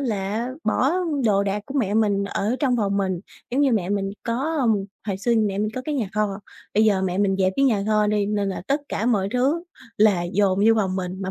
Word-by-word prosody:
là 220 -1 -2 0.2
bỏ 255 +6 +2 0.3
đồ 200 -3 +3
đạc 200 +1 -2
của 275 - -8
mẹ 205 -5 0
mình 205 -2 +2
ở 205 +4 -1
trong 255 -4 +2
phòng 200 -3 0
mình, 190 -3 -1 0.3
giống 260 +4 +1
như 280 -3 +3
mẹ 195 -6 0
mình 195 -1 -1
có, 270 +8 -1
ờm, 230 -4 +3 0.3
hồi 195 -3 -1
xưa 235 +4 +1
mẹ 205 -3 +1
mình 215 - 0
có 255 - -4
cái 300 - -2
nhà 230 -8 -1
kho, 210 -2 0 0.4
bây 215 +2 +4
giờ 200 -3 +3
mẹ 185 0 -1
mình 195 -1 +2
dẹp 190 -1 +2
cái 275 - +3
nhà 220 -7 +2
kho 215 -1 +2
đi 210 -1 +1
nên 205 -1 -1
là 190 - -4
tất 280 +2 +1
cả 225 - -2
mọi 200 -6 +2
thứ 270 +7 +1 0.3
là 205 -4 +4
dồn 195 -1 +2
vô 225 - +6
phòng 190 -3 0
mình, 185 +1 -4
mà 190 - -3
210 Hz, 245 wpm, -23 LUFS, 195-235 Hz, 0.4 s, vô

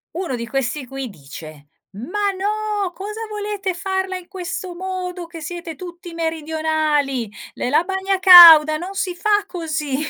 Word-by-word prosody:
Uno 345 -7 -3
di 235 -1 -5
questi 270 +2 -3
qui 270 0 -6
dice: 150 -2 -12 0.2
"Ma 370 - -2
no, 415 0 -2
cosa 420 +5 -7
volete 415 -2 -4
farla 380 +1 -3
in 360 -1 -13
questo 365 -1 -6
modo 365 -1 -5
che 335 0 -11
siete 335 +1 -7
tutti 350 0 -10
meridionali 310 -6 -1 0.2
ne - - -3
la 305 +5 +3
bagna 385 +1 -2
cauda 335 -5 +10
non 355 +5 -6
si 370 -2 -3
fa 415 +3 +1
così". 305 -6 -4
345 Hz, 150 wpm, -20 LUFS, 300-380 Hz, 0.2 s, cauda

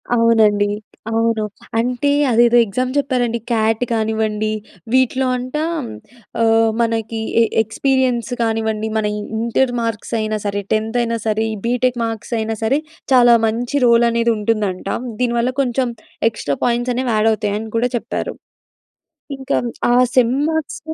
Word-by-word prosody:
అవునండీ, 220 -3 +3 0.4
అవును. 225 -1 +1 0.4
అంటే 250 +4 0 0.2
అదేదో 240 +1 +5
ఎగ్జామ్ 255 +5 -2
చెప్పారండి. 250 -4 0
క్యాట్ 225 0 +1
కానివ్వండి 220 -1 0 0.4
వీటిలో 260 0 +2
అంటా 255 +5 -3 0.8
ఆహ్, 225 0 +4
మనకీ 225 -1 -1 0.2
ఎ - - +6 0.2
ఎక్స్‌పీరియన్స్ 250 +1 0
కానివ్వండి 220 -1 -1
మన 215 - 0
ఇ - - -4 0.2
ఇంటర్ 235 +2 +1
మార్క్స్ 230 0 -4
అయినా 215 0 -1
సరే 205 0 -1
టెన్త్ 220 +2 -1
అయినా 230 -1 -1
సరే 215 0 +1
ఈ - - -4
బీటెక్ 245 0 +1
మార్క్స్ 225 +1 -5
అయినా 220 0 -2
సరే 265 +6 +2 0.3
చాలా 240 -2 +7
మంచి 235 +4 -2
రోల్ 235 0 +5
అనేది 235 0 +1
ఉంటుందంట. 210 -3 -1 0.3
దీని 240 -1 +1
వల్ల 240 +2 +1
కొంచెం 255 0 0 0.4
ఎక్స్‌ట్రా 145 -10 -3
పాయింట్స్ 240 +1 0
అనేవి 250 -2 -1
యాడ్ 215 +1 +3
అవుతాయి 210 -2 -2
అని 220 0 -7
కూడా 245 +2 +1
చెప్పారు. - - -4 1.1
ఇంకా 265 - -1 0.4
ఆ - - +4 0.2
సెమ్ 250 0 +4
మాక్స్ 320 -2 -3
230 Hz, 140 wpm, -19 LUFS, 220-245 Hz, 1.1 s, చాలా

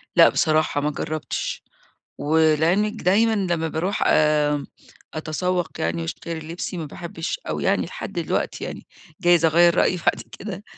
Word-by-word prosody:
لأ، - - +8
بصراحة 155 -2 +1
ما 150 +1 0
جربتش 155 +2 -4 0.6
ولعلمِك 160 +7 +2
دايمًا 220 +5 +3
لما 175 -5 0
باروح 180 +6 -2
آآ، 150 -2 +3 0.5
أتسوق 175 +3 -2
يعني 85 0 -1
واشتري 160 - -5
لبسي 165 +3 -5
ما 165 - -4
باحبش 165 - -5
أو - - -2
يعني - - +1
لحد - - -6
الوقتي - - -2
يعني - - -7 0.3
جايز 175 -2 +4
أغيَّر 170 +2 +5
رأيي 180 - +2
بعد 170 - 0 0.2
كده 200 -1 -7
165 Hz, 140 wpm, -23 LUFS, 155-180 Hz, 0.6 s, لأ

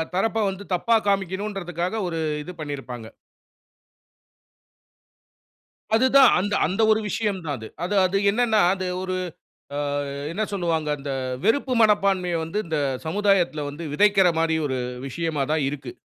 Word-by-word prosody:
தரப்ப 220 +4 +1
வந்து 195 +1 -7
தப்பா 230 +6 +2
காமிக்கணும்ன்றதுகாக 195 -1 -2
ஒரு 165 -2 -3 0.2
இது 180 - -8
பண்ணியிருப்பாங்க. 135 -6 -6 2.9
அதுதான் 260 +2 +6
அந்த, 205 +2 -2
அந்த 190 +7 0
ஒரு 220 0 +4
விஷயம் 205 -1 -1
தான் 145 - -2
அது-அது-அது 185 - 0
என்னனா, 220 0 +2
அது 190 -1 -4 0.2
ஒரு, 185 0 -2 0.6
அ - - -2 0.5
என்ன 205 +6 -1
சொல்லுவாங்க? 165 -5 -1
அந்த 140 0 -5 0.3
வெறுப்பு 255 +4 +2
மனப்பான்மைய 195 -5 +3
வந்து 165 +6 -3
இந்த 160 -2 -1 0.3
சமுதாயத்ல 175 -4 +1
வந்து 155 +4 -7
விதைக்கிற 195 +1 +5
மாரி 165 0 +2
ஒரு 130 -2 -2 0.3
விஷயமா 155 0 -2
தான் 155 -2 +1
இருக்கு. 135 -4 -7
185 Hz, 125 wpm, -24 LUFS, 160-205 Hz, 2.9 s, அதுதான்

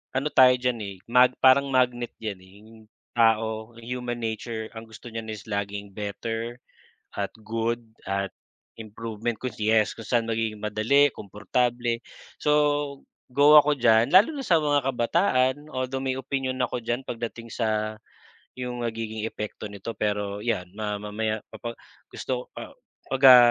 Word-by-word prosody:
ano 140 +3 +1
tayo 130 -1 +8
diyan 125 -2 -1
eh, 100 -1 -6
mag 125 +1 +6
parang 135 +2 +6
magnet 125 -1 +2
diyan 105 -4 -4
eh 95 0 -18
yung 110 +1 -17 0.5
tao, 110 0 +2
human 120 0 -4
nature 110 0 -4
ang 110 0 -7
gusto 110 +2 -11
niyan 115 -1 -6
is 105 - -9
laging 100 0 -3
better 115 +3 -4 0.6
at 100 -1 -2
good 115 +1 -1 0.3
at 100 0 -1 0.5
improvement 110 +1 -4
kung 130 -3 -3
yes, 110 0 +3
kung 115 - -8
saan 115 -2 +1
magiging 110 -1 -1
madali, 115 +7 +3
komportable. 115 +4 -1 0.4
So 150 - +3 0.8
go 145 +3 +6
ako 150 0 +4
diyan, 115 +1 +4
lalo 205 +11 +8
na 275 - -3
sa 170 -3 +5
mga 145 -1 +2
kabataan, 130 +1 +1
although 130 0 -2
may 130 -1 -1
opinyon 130 0 -2
ako 125 0 -1
diyan 120 +3 -2
pagdating 115 0 -5
sa 110 -1 -1 0.6
'yong 125 -1 -4
nagiging 110 -1 -4
epekto 105 -1 -6
nito, 100 +3 -6
pero 105 -1 -1
'yan 90 -6 -2
ma 105 -1 -2
mamaya 110 +1 -2
papag 115 +2 -6 0.4
gusto 125 -1 -4
ko, - - -8
ah, - - -8 0.4
pag, 135 0 -1
ah, 125 -2 +10
115 Hz, 155 wpm, -26 LUFS, 110-125 Hz, 0.8 s, ah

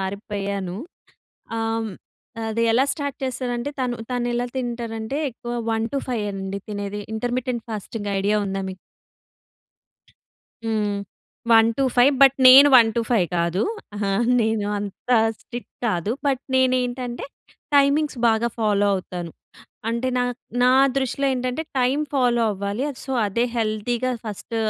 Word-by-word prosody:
మారిపోయాను. 195 -1 -4 0.8
ఆహ్, 225 0 -1 0.6
అది 225 +1 0
ఎలా 245 +4 +4
స్టార్ట్ 285 -2 -4
చేస్తారంటే 250 0 -2
తను 250 -2 -1
తను 245 -1 -1
ఎలా 240 +1 0
తింటారంటే 235 0 -3
ఎక్కువ 240 0 -7 0.2
1-5 225 0 -2
అండి 195 0 -4
తినేది 205 0 -4 0.2
ఇంటర్మిటెంట్ 245 +1 -2
ఫాస్టింగ్ 210 -1 -5
ఐడియా 205 +2 +1
ఉందా 195 0 -2
మీకు? 185 - -8 1.9
హ్మ్. 210 -2 -1 0.5
1-5 245 +4 +4
బట్, 275 0 +7
నేను 275 +3 +10
1-5 225 -4 +3
కాదు. 170 +3 +1 0.3
ఆ! - - -5 0.4
నేను 220 -2 0
అంత 205 +4 -7 0.3
స్ట్రిక్ట్ 240 0 -9
కాదు. 190 -2 0 0.2
బట్, 270 -1 +1
నేనేంటంటే 250 -1 0 0.5
టైమింగ్స్ 285 0 +3
బాగా 225 +1 +2
ఫాలో 205 -2 +2
అవుతాను. 180 -2 -5 0.6
అంటే 235 +3 -1
నా - - +2 0.4
నా 250 - +5 0.3
దృష్టిలో 270 +1 0
ఏంటంటే 255 +4 -2 0.2
టైం 255 +3 +2 0.2
ఫాలో 245 -3 +2
అవ్వాలి. 200 +5 -3 0.2
సో, 265 - -6
అదే 210 +4 0
హెల్తీగా 230 +3 -1
ఫస్ట్ 215 +2 -6
230 Hz, 115 wpm, -23 LUFS, 205-250 Hz, 1.9 s, నేను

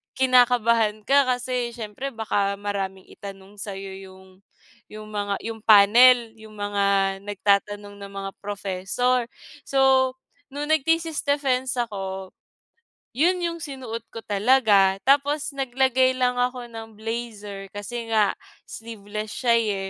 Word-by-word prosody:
kinakabahan 235 -4 +3
ka 280 +3 +4
kasi 245 -1 -3
siyempre 230 +4 -5
baka 205 -3 0
maraming 195 -2 -4
itanong 195 0 -11
sa'yo 195 -1 -6
'yung 190 0 -14 0.6
'yung 215 0 -10
mga 205 -1 -2
'yung 225 0 -5
panel, 230 +3 +6
'yung 220 0 -13
mga 200 -1 +1
nagtatanong 205 0 0
na 200 - -8
mga 195 0 -5
professor. 205 +5 -1 0.4
So, 265 -1 +3 0.4
nung 290 +2 -5
nag-thesis 325 +1 +1
defense 265 -3 0
ako, 195 -5 -4 0.8
'yun 350 +7 +2
'yung 335 -1 -2
sinuot 255 -6 -6
ko - - -7
talaga. 205 -3 +3
Tapos 285 +1 +2
naglagay 260 -1 +2
lang 250 -1 +2
ako 245 0 -1
ng 225 -2 -10
blazer 210 -4 -6
kasi 225 +3 -6
nga 215 -2 +3 0.3
sleeveless 215 -1 -7
siya, 235 -2 +3
eh. 200 -4 -1
225 Hz, 120 wpm, -24 LUFS, 200-255 Hz, 0.8 s, panel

